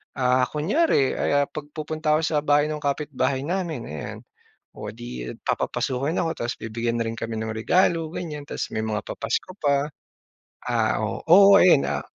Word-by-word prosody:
ah, 125 0 +2
kunyari 155 - +2
ay, - - -1
ah, - - -5
'pag 150 -1 -8
pupunta 155 0 0
ako 155 - +1
sa 155 -2 +1
bahay 145 0 +3
ng 150 - -3
kapitbahay 140 -2 -1
namin, 170 -6 -2
ayan. 75 0 -6 0.6
O - - -6
'di - - -6
papapasukin 135 +6 -1
ako 165 - 0
tapos 120 +1 -2
bibigyan 115 +1 -2
na - - +1
rin 115 0 -4
kami 115 0 -4
ng 110 0 -3
regalo 165 +7 +2
ganyan 150 -4 -5
tapos - - -4
may - - -2
mga 110 -1 -2
papasko 115 +10 -3
pa. 140 0 +1 0.8
Ah, 115 -3 +1
o 110 - -2
oo 195 +4 +8
ayan, 175 -6 +6
ah - - -3
145 Hz, 170 wpm, -24 LUFS, 115-160 Hz, 0.8 s, oo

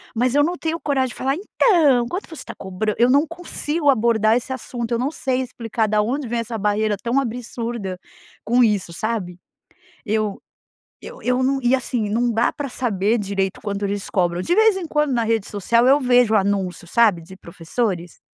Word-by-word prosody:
mas 250 +2 +1
eu 290 0 +4
não 350 +3 0
tenho 325 0 -2
coragem 270 -3 0
de - - -10
falar: 270 +1 -1
"Então, 315 - +3
quanto 370 +3 -4
você 330 - -12
está - - -9
cobra". 190 +3 -3
Eu 240 +2 +4
não 285 +4 +4
consigo 330 -3 -2
abordar 225 -3 +3
esse 245 +2 -3
assunto, 240 -2 -5
eu 235 - +1
não 270 +4 -1
sei 260 -4 -1
explicar 230 -3 -2
da 210 0 +2
onde 255 +5 -2
vem 235 0 -2
essa 230 0 -4
barreira 210 0 +1
tão 240 +3 +1
absurda 235 -6 -4 0.4
com 245 +3 +3
isso, 205 -6 +1
sabe. 190 -3 -3 0.7
Eu 215 -1 -1 0.6
eu - - -10
eu 250 +1 +1
não 270 +1 +1
e, 245 +1 +2
assim, 235 -4 -2
não 235 +2 +1
dá 230 +2 +2
pra 290 -1 -5
saber 225 -3 0
direito 195 -2 -2
quando 205 -1 -4
eles 200 0 -3
cobram. 175 -2 0
De 345 - 0
vez 440 -1 +5
em 380 -2 -4
quando 300 -3 0
na 235 -2 +1
rede 225 -2 0
social 230 +4 +2
eu 280 +2 +6
vejo 245 -3 +4
o - - +6
anúncio, 190 -4 -1
sabe, 210 -5 +3
de 185 +3 -13
professores? 175 +1 -4
235 Hz, 195 wpm, -21 LUFS, 205-260 Hz, 0.7 s, eu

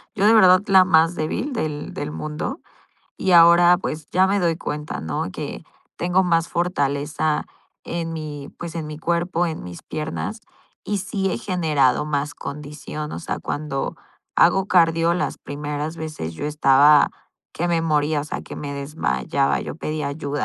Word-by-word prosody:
Yo 200 -1 +1
de 220 - +6
verdad 185 -4 +7
la 190 -1 +6
más 165 -1 +4
débil 180 - -2
del 150 -9 -3
del 150 +1 -4
mundo. 155 - -4 0.6
Y 185 - 0
ahora, 170 +1 +7
pues, 155 -5 -5
ya 185 +1 +4
me 200 +1 +1
doy 170 -2 +1
cuenta, 150 -2 -5
¿no?, 80 -1 -3
que - - -6 0.4
tengo 180 +2 +2
más 165 -1 +2
fortaleza 150 -2 0 0.4
en 165 -1 -3
mi, 150 -3 -6
pues, 170 -1 -6
en 160 -2 -4
mi 150 - -7
cuerpo, 170 +1 0
en 160 -2 -4
mis 90 -1 -9
piernas, 160 +8 -4 0.4
y 205 -1 -1
sí 195 0 -2
he - - -1
generado 150 -7 +1
más 145 0 -2
condición. 150 +1 -7
O - - -4
sea, - - -4
cuando 145 -2 -3 0.4
hago 195 0 +4
cardio, 165 -1 +4
las 180 - -2
primeras 150 +2 -5
veces 155 - -5
yo 145 - -4
estaba 145 0 +5 0.4
que 175 +2 -2
me 165 -1 +1
moría, 150 -1 +1
o 145 - -5
sea, - - -5
que - - -9
me 140 -1 -5
desmayaba. 140 0 -1
Yo - - -6
pedía 155 -2 -3
ayuda. 145 0 -3
155 Hz, 165 wpm, -22 LUFS, 145-175 Hz, 0.6 s, verdad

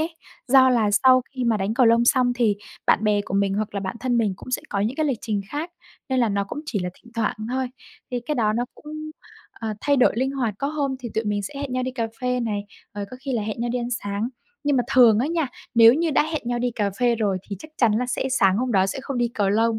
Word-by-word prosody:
ấy, 325 +1 -3 0.3
do 260 0 +7
là 225 -4 +2
sau 255 +4 +5
khi 255 -2 -3
mà 230 -2 +2
đánh 205 +3 -1
cầu 250 -1 +4
lông 230 +1 +5
xong 250 0 +3
thì 225 -4 +2 0.3
bạn 215 - +3
bè 210 -1 +3
của 195 - -5
mình 200 -1 +2
hoặc 210 0 -2
là 200 - -1
bản 190 +3 -4
thân 245 -2 +1
mình 215 -4 +1
cũng - - -10
sẽ 255 - -1
có 200 - -1
những 225 +6 -1
cái 310 -1 +1
lịch 255 -6 -1
trình 215 -4 -2
khác 310 +4 -4 0.4
nên 260 -1 +1
là 235 - +3
nó 200 0 0
cũng 245 +9 -6
chỉ 215 - -2
là 180 -1 -3
thỉnh 235 +4 -19
thoảng 225 -1 0
thôi, 260 0 -1 0.4
thì 245 - -2
cái 300 - 0
đó 215 -3 +2
nó 235 +3 0
cũng, 310 +1 -8 0.4
ờ, 220 -2 -5
thay 285 -1 +2
đổi 255 - +5
linh 265 +2 +1
hoạt, 240 -7 -1
có 275 - -1
hôm 285 -3 -1
thì 240 - -5
tụi 220 +1 0
mình 205 -1 -1
sẽ 280 - -7
hẹn 275 -3 -4
nhau 255 - 0
đi 255 - -2
cà 235 -3 -2
phê 250 0 0
này, 210 -3 -2 0.3
rồi 205 -1 -3
có 255 - -8
khi 270 0 -4
là 230 -4 0
hẹn 215 +2 -4
nhau 240 - -1
đi 250 - 0
ăn 240 0 -3
sáng. 205 -1 -2 0.4
Nhưng 290 -1 +2
mà 250 - +3
thường 235 -5 +7
á 255 - +1
nha, 325 -1 0 0.3
nếu 230 +1 +8
như 325 +2 +1
đã 295 - +4
hẹn 310 - -2
nhau 240 0 -1
đi 245 +1 0
cà 210 -3 -1
phê 240 -1 +4
rồi 205 -4 0
thì 200 - -4
chắc 310 - -12
chắn 230 -4 +3
là 245 +3 0
sẽ 265 +1 -1
sáng 195 -7 +3
hôm 250 0 -1
đó 190 -1 +4
sẽ 195 - -3
không 270 -3 -4
đi 240 -1 +2
cầu 205 -4 0
lông, 225 +2 +2
240 Hz, 290 wpm, -23 LUFS, 210-260 Hz, 0.4 s, nếu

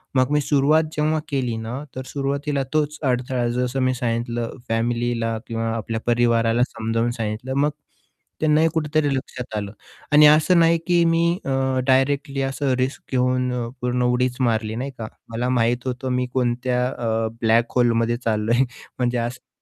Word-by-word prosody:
मग 130 +1 +3
मी 150 0 +3
सुरुवात 145 +2 +3
जेव्हा 155 +1 +1
केली 125 -5 -1
ना 110 +2 -5 0.2
तर 130 - -4
सुरुवातीला 140 +1 -2
तोच 150 -1 0
अडथळा 125 -2 0
जसं 125 +1 -1
मी 130 0 +2
सांगितलं 120 -1 -2
फॅमिलीला 115 0 0
किंवा 115 -1 -2
आपल्या 115 0 -3
परिवाराला 120 -1 +2
समजावून 115 +1 -1
सांगितलं, 115 +4 -3
मग 145 +2 +3 0.7
त्यांनाही 155 +1 +4
कुठेतरी 150 -2 +1
लक्षात 125 -3 -6
आलं 100 -1 -4 0.4
आणि 150 +1 +8
असं 155 +4 +5
नाही 165 0 +5
की 175 -1 +4
मी 165 0 +3 0.2
अ, 135 - -2 0.4
डायरेक्टली 135 +1 +2
असं 135 0 -1
रिस्क 130 +2 -2
घेऊन 125 0 +1
अ, 120 -2 -2
पूर्ण 125 0 0
उडीच 125 0 +1
मारली 110 -3 0
नाही 130 +4 -4
का, 110 - -5 0.2
मला 120 +2 -2
माहित 120 0 +1
होतं 130 +1 -3
मी 125 0 0
कोणत्या 125 0 0
अ, 115 -2 -1
ब्लॅक 115 +1 +2
होलेमध्ये 120 -1 +2
चाललोय 115 +3 +2 0.4
म्हणजे 125 -1 +1
असं 120 +2 -4
125 Hz, 155 wpm, -22 LUFS, 115-140 Hz, 0.7 s, आणि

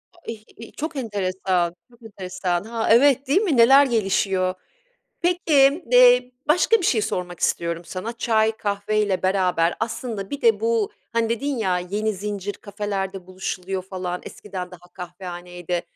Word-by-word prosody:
A - - -21
ih 220 -2 -10
i 230 - -10
Çok 315 +1 -5
enteresan, 190 -7 -1 0.2
çok 235 -1 -22
enteresan. 185 -4 -3
Ha, 225 +1 -3
evet, 270 +3 +5
değil 315 +9 +3
mi? 345 - +1
Neler 270 +5 +7
gelişiyor? 195 -5 +1 0.7
Peki, 320 -4 +3
eee, - - +6 0.2
başka 355 +8 +4
bir 390 - -6
şey 225 -9 +2
sormak 180 -4 -3
istiyorum 170 0 -1
sana 200 +7 -5
çay, 220 -2 +2
kahveyle 205 -1 -1
beraber 185 -3 +2
aslında 220 -3 -4
bir 285 - -5
de 455 -1 +4
bu, 450 -2 0 0.2
hani, 230 -1 0
dedin 275 +5 -1
ya, 185 -5 0
"yeni 205 +4 -2
zincir 205 0 -4
kafelerde 195 -2 -5
buluşuluyor" 185 0 -4
falan, 185 -1 -5
eskiden 185 -3 -7
daha 175 -1 -14
kahvehaneydi. 175 -1 -6
205 Hz, 145 wpm, -23 LUFS, 185-240 Hz, 0.7 s, Neler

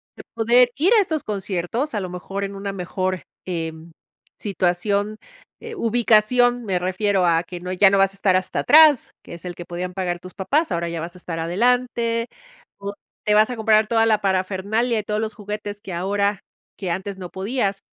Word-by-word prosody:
de - - -11
poder 240 +2 +4
ir 350 +10 +4
a 445 - +6
estos 315 -6 -2
conciertos, 205 - -3
a 210 - -1
lo 185 - -4
mejor 195 +2 -5
en 200 0 -4
una 200 0 -4
mejor, 185 0 -3 0.2
em, 165 -2 -5 0.5
situación, 200 +2 0 0.5
eh, 460 0 -7
ubicación 240 - +3
me 190 -3 0
refiero, 185 +1 +1
a 165 -1 +3
que 175 0 -8
no 180 +1 -5
ya 190 +2 +5
no 200 - +2
vas 195 0 +4
a - - -10
estar 195 -1 +2
hasta 185 0 -1
atrás, 305 -4 +6
que - - -11
es 170 - -12
el 175 -1 -5
que 175 - -7
podían 180 +1 -5
pagar 180 -2 -2
tus 185 +1 -11
papás. 290 - 0
Ahora 170 0 -1
ya 170 -1 -4
vas 170 +2 -6
a - - -11
estar 165 -2 -5
adelante, 230 +5 +1 0.5
o 200 0 -5 0.3
te 210 - +3
vas 215 +2 +5
a 250 - -3
comprar 220 -1 +3
toda 225 0 +3
la 215 -2 +3
parafernalia 200 +5 0
y - - -4
todos 210 +1 -2
los 220 -1 -3
juguetes 210 0 -6
que 195 -4 -7
ahora 200 +3 0 0.4
que 185 -4 -3
antes 190 +3 -4
no 180 -2 -7
podías. 200 +1 -2
200 Hz, 200 wpm, -22 LUFS, 185-225 Hz, 0.5 s, a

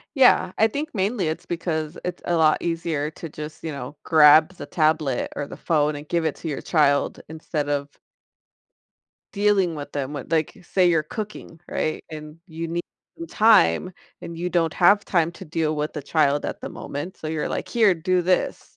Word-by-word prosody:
Yeah, 250 -8 +5
I 220 - +5
think 290 +7 -4
mainly 195 -3 0
it's 160 - -4
because 165 -2 -3
it's 180 0 -4
a 175 - 0
lot 155 -1 +4
easier 165 -3 -2
to 165 - -8
just, 150 0 -9
you 160 - -4
know, 140 0 -7
grab 155 +2 +6
the - - -8
tablet, 155 -5 0
or 145 - -3
the - - -9
phone, 150 -2 +1
and 145 +1 -9
give 170 -1 0
it 160 - 0
to 165 - -6
your 145 - -3
child 145 -4 +2
instead 155 -1 -4
of 145 -1 -1 1.4
dealing 200 -4 +2
with 145 0 -7
them 140 -1 -3
with 145 -1 -7
like, 160 -2 0
say 180 +1 +2
you're 165 -2 +3
cooking, 205 -2 -7
right, 155 - -2
and 155 0 -9
you 165 0 -5
need 170 +1 -3 0.3
some 335 0 -7
time, 185 - +4 0.3
and 170 -1 -8
you 175 +2 -3
don't 165 -3 +1
have 200 +3 +4
time 170 -3 +1
to - - -11
deal 155 -1 -1
with 150 +1 -2
the 150 - -6
child 145 -1 +1
at - - -4
the - - -5
moment, 160 +7 -6
so, 155 - -6
you're 155 -1 -2
like, - - -4
here, 220 -5 +4
do 180 +2 0
this, 180 +1 -1
160 Hz, 195 wpm, -23 LUFS, 150-180 Hz, 1.4 s, grab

